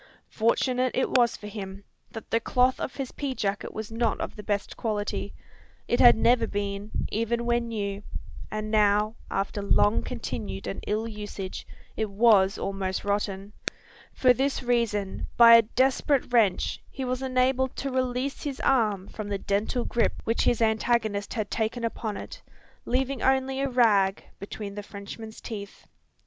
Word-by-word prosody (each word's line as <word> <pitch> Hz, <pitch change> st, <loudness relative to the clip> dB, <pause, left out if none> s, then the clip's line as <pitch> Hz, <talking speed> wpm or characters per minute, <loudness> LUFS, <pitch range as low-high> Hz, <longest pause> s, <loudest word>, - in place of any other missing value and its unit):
Fortunate 250 Hz, +3 st, +1 dB
it 260 Hz, -, +1 dB
was 240 Hz, -2 st, +3 dB
for -, -, -11 dB
him, 200 Hz, -2 st, -7 dB, 0.3 s
that 225 Hz, -, -9 dB
the 230 Hz, -, +3 dB
cloth 250 Hz, +2 st, +2 dB
of -, -, -4 dB
his 270 Hz, -2 st, -4 dB
pea 275 Hz, -3 st, -4 dB
jacket 200 Hz, -2 st, -2 dB
was 220 Hz, 0 st, -6 dB
not 225 Hz, -1 st, 0 dB
of -, -, -4 dB
the 210 Hz, -, -7 dB
best 205 Hz, -1 st, -2 dB
quality. 205 Hz, -3 st, -2 dB, 0.6 s
It 240 Hz, -, +1 dB
had 240 Hz, -, +8 dB
never 240 Hz, +2 st, +3 dB
been, 200 Hz, 0 st, -3 dB, 0.2 s
even 235 Hz, +2 st, -1 dB
when 235 Hz, 0 st, +1 dB
new; 200 Hz, -3 st, -3 dB, 0.5 s
and 215 Hz, 0 st, -4 dB
now, 210 Hz, 0 st, +3 dB, 0.2 s
after 195 Hz, +1 st, -2 dB
long 205 Hz, +1 st, +3 dB
continued 110 Hz, -, -5 dB
and 100 Hz, -, -5 dB
ill 215 Hz, +2 st, 0 dB
usage, 205 Hz, -3 st, -6 dB, 0.3 s
it 220 Hz, -1 st, -1 dB
was 200 Hz, -2 st, +4 dB
almost 195 Hz, -1 st, -3 dB
rotten. 200 Hz, 0 st, -2 dB, 0.6 s
For 255 Hz, -1 st, +4 dB
this 270 Hz, +1 st, -1 dB
reason, 230 Hz, -5 st, 0 dB
by 235 Hz, -1 st, +9 dB
a 230 Hz, -, +10 dB
desperate 260 Hz, +3 st, +1 dB
wrench, 210 Hz, -6 st, +2 dB
he 265 Hz, -, -5 dB
was 255 Hz, +1 st, -2 dB
enabled 260 Hz, 0 st, +1 dB
to 275 Hz, -, -3 dB
release 255 Hz, +1 st, -1 dB
his 280 Hz, -3 st, -4 dB
arm 210 Hz, -7 st, +2 dB
from 215 Hz, -2 st, -7 dB
the 200 Hz, -, -1 dB
dental 205 Hz, +5 st, -1 dB
grip 235 Hz, -, +1 dB
which 230 Hz, -, 0 dB
his 235 Hz, -, +3 dB
antagonist 220 Hz, -2 st, 0 dB
had 215 Hz, -3 st, -3 dB
taken 230 Hz, +2 st, -1 dB
upon 225 Hz, -2 st, -3 dB
it, -, -, -8 dB, 0.4 s
leaving 260 Hz, +1 st, -1 dB
only 265 Hz, 0 st, +2 dB
a 275 Hz, -, 0 dB
rag 210 Hz, -6 st, +3 dB, 0.2 s
between 200 Hz, 0 st, -6 dB
the 205 Hz, -, -5 dB
Frenchman's 205 Hz, +2 st, -9 dB
teeth. 205 Hz, -3 st, -8 dB
220 Hz, 160 wpm, -27 LUFS, 205-245 Hz, 0.6 s, a